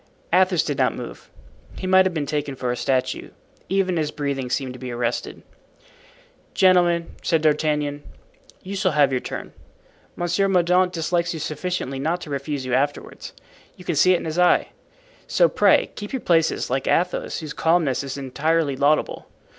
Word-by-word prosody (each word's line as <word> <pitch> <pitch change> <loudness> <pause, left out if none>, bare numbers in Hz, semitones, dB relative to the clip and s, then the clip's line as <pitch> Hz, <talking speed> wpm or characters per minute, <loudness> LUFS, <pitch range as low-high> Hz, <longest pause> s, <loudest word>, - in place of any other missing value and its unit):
Athos 185 -2 +4
did 145 -3 -3
not - - +2
move. - - -9 0.5
He - - -5
might 185 0 +5
have 185 - -3
been 150 -2 -1
taken 145 -1 -3
for 125 -1 -2
a - - -1
statue. 130 0 -1 0.4
Even 190 -2 +1
his 155 -2 0
breathing 140 -4 -3
seemed 130 0 -2
to 125 - -11
be 130 0 -6
arrested. 120 0 -3 1.1
"Gentlemen," 175 -2 +3
said 160 -2 +1
D'Artagnan, 150 -1 +1 0.6
"you 195 +2 -6
shall 190 -3 +1
have 145 -2 +4
your 130 -1 0
turn. - - -7 0.6
Monsieur 175 +3 0
Mordaunt 180 0 +3
dislikes 170 0 -1
you - - -5
sufficiently 150 -2 -3
not 165 +6 -1
to 150 - -8
refuse 140 -1 -3
you 130 - -3
afterward. 145 +3 -2 0.5
You 180 - -13
can 170 - -1
see 185 +5 +5
it - - +2
in - - -7
his 160 +2 -2
eye. 180 0 +4 0.6
So - - +4
pray - - +3
keep 210 +3 -8
your 265 - -1
places, 165 -6 +1
like 135 +1 -1
Athos, 180 +1 0
whose 155 -2 -6
calmness 160 -6 +1
is 135 0 -5
entirely 145 +2 0
laudable. 145 +3 +1
155 Hz, 170 wpm, -23 LUFS, 140-180 Hz, 1.1 s, might